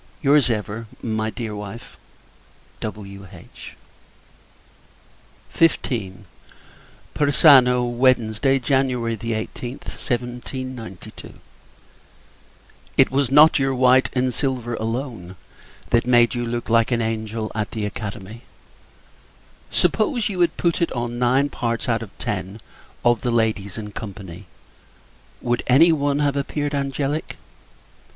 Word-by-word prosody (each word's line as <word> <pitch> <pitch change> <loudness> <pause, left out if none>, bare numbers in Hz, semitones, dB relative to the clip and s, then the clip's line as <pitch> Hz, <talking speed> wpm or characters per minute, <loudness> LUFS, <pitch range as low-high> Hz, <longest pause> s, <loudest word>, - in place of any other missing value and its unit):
Your's, 140 -2 +4
ever, 110 0 -3 0.2
my 110 -1 -1
dear 110 -2 -5
wife, 105 +3 -8 0.8
W.H. 100 -3 -9 1.8
XV. 120 - +1 1.0
Persano, 135 -4 +5
Wednesday, 125 +1 +2
[Jan. 135 +1 +2
18th, 115 +1 -4
1792.] 125 -3 -6 1.6
It - - +5
was 135 -1 +1
not 150 +3 +6
your 135 -1 +1
white 130 +1 +4
and 130 -1 0
silver, 125 -2 -2
alone, 115 -5 -4 0.6
that 120 0 +2
made 120 -1 +5
you 120 -1 -2
look 120 0 -3
like 115 +1 +3
an 120 -1 +1
angel, 110 0 -3
at 110 0 -2
the 110 -2 -3
Academy. 105 +1 -6 1.3
Suppose 250 - +1
you 190 -3 -4
had 170 -1 +2
put 170 0 0
it 170 - +1
on 120 -1 -3
nine 130 +3 +3
parts 115 -3 -3
out 115 -2 +1
of 115 - -7
ten 105 -2 -4 0.5
of 120 -2 +3
the 125 - -1
ladies 110 -4 0
in 105 -1 -6
company, 100 -4 -9 0.9
would 120 0 0
any 155 +7 +6
one 145 -2 +1
have 145 -1 +1
appeared 145 +1 -2
angelic? 140 +2 -2
120 Hz, 110 wpm, -22 LUFS, 110-135 Hz, 1.8 s, not